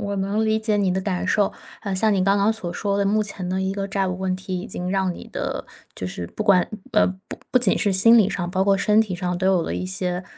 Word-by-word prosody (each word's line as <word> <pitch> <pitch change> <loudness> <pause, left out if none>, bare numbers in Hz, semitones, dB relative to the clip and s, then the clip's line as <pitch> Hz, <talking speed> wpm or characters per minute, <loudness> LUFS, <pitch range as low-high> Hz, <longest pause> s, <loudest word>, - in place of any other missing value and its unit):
我 200 -1 -3
能 200 +3 0
理 220 0 +2
解 220 -1 0
你 200 -2 +1
的 190 - -1
感 185 -2 -2
受。 200 +2 +2 0.3
呃， 200 -3 -3
像 215 +3 +2
你 195 -2 +2
刚 200 +1 +3
刚 200 +2 +3
所 190 -6 -5
说 200 +2 -1
的， 200 - +1
目 210 +2 +2
前 200 -3 -5
的 185 +1 -1
一 190 0 -1
个 195 0 -3
债 195 -1 -1
务 180 0 -4
问 185 -1 -1
题 185 0 -4
已 180 - -6
经 180 -2 -5
让 190 -1 0
你 - - -10
的 - - -4 0.3
就 90 - -5
是 90 -1 -5
不 - - -4
管 195 -4 +4 0.3
呃， - - +4 0.2
不 - - -6
不 255 - +4
仅 240 -6 +2
是 200 - +1
心 230 +5 +6
理 210 -3 +4
上， 175 -1 -3
包 190 +1 +1
括 200 0 +3
身 210 +2 +3
体 210 -4 -1
上 180 0 -2
都 185 +1 -1
有 190 -3 +3
了 - - -3
一 - - -3
些 185 -1 -2
195 Hz, 300 characters per minute, -23 LUFS, 185-205 Hz, 0.3 s, 心